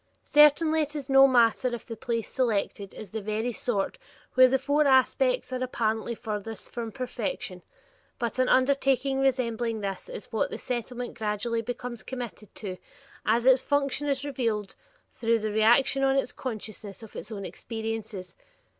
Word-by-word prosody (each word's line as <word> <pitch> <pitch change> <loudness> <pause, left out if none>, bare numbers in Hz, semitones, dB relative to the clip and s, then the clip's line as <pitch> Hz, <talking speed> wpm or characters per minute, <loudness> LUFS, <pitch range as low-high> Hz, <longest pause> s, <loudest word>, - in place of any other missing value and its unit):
Certainly 310 +2 +5
it 300 0 -3
is 285 -2 -5
no 270 0 +8
easy 270 - +3
matter 240 +1 +3
if 235 - -10
the 230 - -6
place 230 0 -2
selected 205 -5 -1
is 215 - -8
of - - -26
the 220 0 -4
very 215 +4 -1
sort 215 - -2 0.3
where 255 0 +8
the 265 +1 +3
four 285 +3 +2
aspects 275 - +3
are 255 0 -1
apparently 230 -2 -1
furthest 220 -1 -5
from 230 -2 -4
perfection, 255 - -4 0.6
but 235 +1 -2
an 255 - +3
undertaking 270 0 +3
resembling 240 -4 0
this 195 - -4
is - - -8
what - - 0
the - - -5
Settlement 245 0 -4
gradually 220 +2 -1
becomes 245 0 -5
committed 240 -5 -7
to, 190 -4 -5 0.5
as 230 +3 +3
its 260 -1 +6
function 285 0 0
is 280 0 0
revealed 230 -7 -2 0.4
through 230 0 +1
the 215 -1 -2
reaction 235 +6 +4
on 270 0 +3
its 270 - 0
consciousness 215 -3 -6
of 220 - -12
its 215 - -6
own 200 -3 -5
experiences. 220 -6 -5
240 Hz, 165 wpm, -27 LUFS, 220-270 Hz, 0.6 s, no